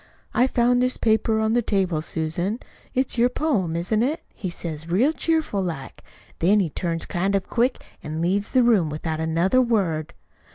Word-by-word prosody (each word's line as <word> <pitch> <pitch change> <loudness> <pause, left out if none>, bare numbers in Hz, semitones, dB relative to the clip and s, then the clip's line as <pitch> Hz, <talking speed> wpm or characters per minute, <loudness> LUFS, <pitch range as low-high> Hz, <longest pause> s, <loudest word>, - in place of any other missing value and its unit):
'I 250 - +4
found 245 0 +2
this 255 0 +1
paper 220 0 +2
on 220 0 +1
the 240 - +3
table, 190 -7 0
Susan. 170 +7 -2 0.4
It's 255 -2 0
your 245 +1 +5
poem, 230 - 0
isn't 180 +6 0
it?' 290 +7 -1
he 190 - -5
says 165 -2 -5
real 240 - +3
cheerful 320 -12 0
like. 160 -8 -5 0.4
Then 200 +5 +4
he 175 -6 0
turns 165 0 -2
kind 190 +2 0
of 195 -1 0
quick 250 +2 +1 0.2
an' 155 +1 -5
leaves 190 +5 0
the 255 -2 +3
room 210 -10 +3
without 155 +1 -3
another 165 +10 +2
word. 190 -11 0
195 Hz, 175 wpm, -23 LUFS, 165-240 Hz, 0.4 s, your